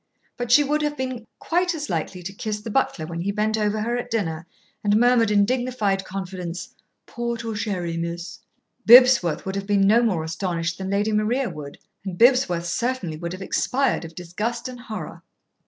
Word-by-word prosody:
But 245 -1 -4
she 290 +4 +7
would 300 +2 0
have 295 0 -1
been 255 -3 -4
quite 350 0 0
as 300 -1 -4
likely 175 +2 -3
to 195 +3 -6
kiss 210 +1 -4
the 215 +1 -7
butler 205 -10 0
when 170 +1 -5
he 200 +3 -1
bent 215 +1 0
over 215 0 0
her 235 +2 -1
at 245 0 -4
dinner 170 -8 -2 0.4
and 205 0 +3
murmured 240 -2 +4
in 205 -1 +4
dignified 230 -6 0
confidence, 185 -2 -6 0.3
"Port 235 -1 -4
or 225 -1 -3
sherry, 180 -5 -2
miss?" 170 +1 -5 0.5
Bibsworth 245 -8 +7
would 190 - -3
have 195 0 -4
been 200 -1 +3
no 220 +4 +5
more 190 -9 +1
astonished 170 0 -3
than 190 0 -4
Lady 205 +2 +1
Maria 220 +3 0
would, 150 -3 -9 0.3
and 190 -3 -5
Bibsworth 235 -8 +4
certainly 195 -2 -2
would 170 +2 -5
have 185 +1 -6
expired 265 +5 0
of 165 0 -10
disgust 185 +9 -4
and 250 -1 -8
horror. 235 -3 -7
210 Hz, 190 wpm, -23 LUFS, 180-245 Hz, 0.5 s, she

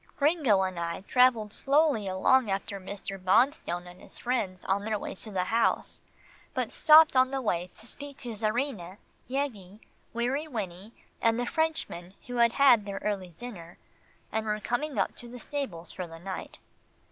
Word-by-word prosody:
Gringo 280 - +3
and 185 -2 -3
I 170 +1 -3
travelled 230 -1 +3
slowly 280 -7 +2
along 210 +6 +3
after 195 +1 -2
Mr. 195 0 -7
Bonstone 185 - +2
and 180 0 -13
his - - -14
friends 210 -7 -2
on 195 +1 0
their 215 0 -1
way - - -5
to 215 - -9
the 190 -3 -1
house, 225 +5 0 0.5
but - - -1
stopped 310 -1 +7
on 255 0 +5
the 270 0 -2
way 180 -8 -1
to 220 - -6
speak 280 +3 -5
to 245 - -7
Czarina, 215 -4 -2 0.3
Yeggie, 220 -8 -3 0.3
Weary 255 +6 -1
Winnie 205 - -6 0.3
and 230 0 +3
the 245 - 0
Frenchmen 275 - -2
who 245 0 -5
had 235 -1 +4
had 255 -6 +6
their 200 -1 -4
early 190 -5 -3
dinner, 180 -9 -9 0.5
and 220 0 -2
were 210 0 0
coming 260 +6 -2
up - - +1
to 240 - -10
the 245 - -9
stables 220 - -5
for 180 -2 -5
the 165 0 -11
night. 190 +2 -7
220 Hz, 170 wpm, -29 LUFS, 190-255 Hz, 0.5 s, stopped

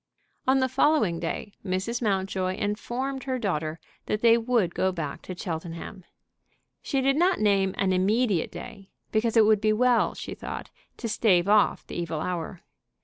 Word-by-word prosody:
On 265 0 +4
the 260 - +3
following 255 - +2
day 175 +4 -4
Mrs. 190 +6 -2
Mountjoy 190 -3 0
informed 245 +7 -3
her 260 -1 -1
daughter 160 -8 -2 0.3
that 210 - -1
they 230 -1 +6
would 230 -7 +1
go 190 - +1
back 155 -6 -5
to 185 - -8
Cheltenham. 170 +1 -6 0.8
She 275 -2 -1
did 275 +1 +2
not 360 +3 +3
name 195 -3 +2
an 190 -1 +1
immediate 200 0 +1
day, 200 -5 -10 0.2
because 225 +1 +1
it 220 - +7
would 215 -1 +4
be 215 0 +3
well, 245 +2 +3
she - - -6
thought, - - -7 0.3
to 235 - -4
stave 200 -5 +3
off 210 0 +3
the - - -10
evil 165 -2 -3
hour. 175 +1 -4
205 Hz, 165 wpm, -26 LUFS, 185-235 Hz, 0.8 s, it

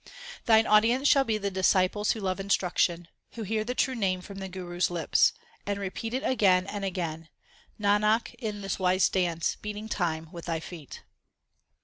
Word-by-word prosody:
Thine 220 -1 +6
audience 230 +6 +4
shall 275 -1 +5
be 220 -3 0
the 200 -1 -3
disciples 190 +2 +2
who 225 - -7
love 190 -1 -2
instruction, 180 -3 0 0.3
Who 230 - -6
hear 215 +1 -1
the 250 +3 -4
true 260 - +1
Name 190 -6 -1
from 195 +1 -9
the 190 - -5
Guru 180 -1 -7
s 180 - +2
lips, 170 -3 +3 0.3
And 200 0 -2
repeat 210 +4 -4
it 265 - -2
again 190 -7 +3
and 200 0 -5
again 165 -4 -4 0.5
Nanak, 210 +2 +2
in 210 -4 -4
this 195 0 -3
wise 185 0 +3
dance 170 -3 0
beating 210 +1 -6
time 165 -6 -2
with 170 -2 -9
thy 165 -2 -2
feet. 160 -4 -10
195 Hz, 175 wpm, -28 LUFS, 180-215 Hz, 0.5 s, Thine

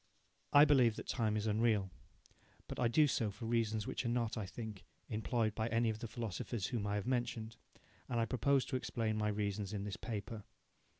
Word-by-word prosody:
I 145 +1 +9
believe 130 -7 +5
that - - -6
time 110 -3 +1
is 105 - -1
unreal. 105 -3 +2 0.8
But - - -6
I 125 - +3
do 150 +6 +5
so 115 -6 +1
for 110 +4 -7
reasons 110 -2 +1
which - - -3
are 120 - -1
not, 120 -2 0
I 110 -5 -3
think, 105 0 -7 0.3
employed 110 0 0
by 110 +1 -1
any 115 0 +2
of 110 - -6
the 115 - -4
philosophers 110 -1 -3
whom 105 -4 -2
I 100 - 0
have 105 -1 -2
mentioned, 120 -3 -2 0.5
and 120 -2 0
I 115 - +3
propose 130 +4 +2
to - - -3
explain 115 -3 -1
my 105 0 0
reasons 105 -1 -2
in 100 -1 -2
this 100 -2 -4
paper. 110 -1 -5
110 Hz, 200 wpm, -36 LUFS, 105-120 Hz, 0.8 s, I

